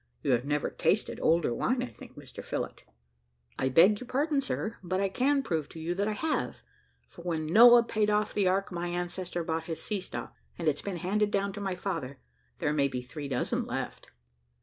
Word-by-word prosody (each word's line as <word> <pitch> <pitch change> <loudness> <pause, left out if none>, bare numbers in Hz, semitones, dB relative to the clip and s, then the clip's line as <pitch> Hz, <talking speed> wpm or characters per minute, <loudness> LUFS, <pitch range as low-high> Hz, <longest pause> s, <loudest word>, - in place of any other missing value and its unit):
You - - +1
have 125 +1 +2
never 145 0 0
tasted - - 0
older 160 -6 +3
wine, 250 - 0
I - - -1
think, - - -13
Mr - - -9
Phillott." - - -4 0.8
"I 130 - +1
beg 185 +10 +6
you 250 - -7
pardon, 285 +3 +1
sir; 230 -4 -3
but 185 +1 -1
I 195 0 +1
can 275 +7 +2
prove 160 - -2
to 165 - -10
you 165 +2 -2
that 200 +3 0
I 215 - 0
have, 315 +8 -2 0.4
for - - -13
when 165 -3 -2
Noah 235 +8 +8
paid 215 -2 0
off 210 0 +1
the 200 -3 +2
ark, 195 +2 +1
my 175 0 -3
ancestor 175 0 -3
bought 160 0 -2
his 165 -1 -4
sea 205 -3 -2
stock, - - -6 0.2
and 170 - -3
it's 150 - +2
been 195 -3 -4
handed 205 +5 +1
down 200 -1 0
to 205 - -6
my 190 -2 -2
father: 165 -8 -4 0.4
there 150 -3 0
may 140 -2 +3
be 125 -2 -4
three 145 +3 -7
dozen 130 -3 -1
left." - - -4
180 Hz, 210 wpm, -29 LUFS, 160-210 Hz, 0.8 s, Noah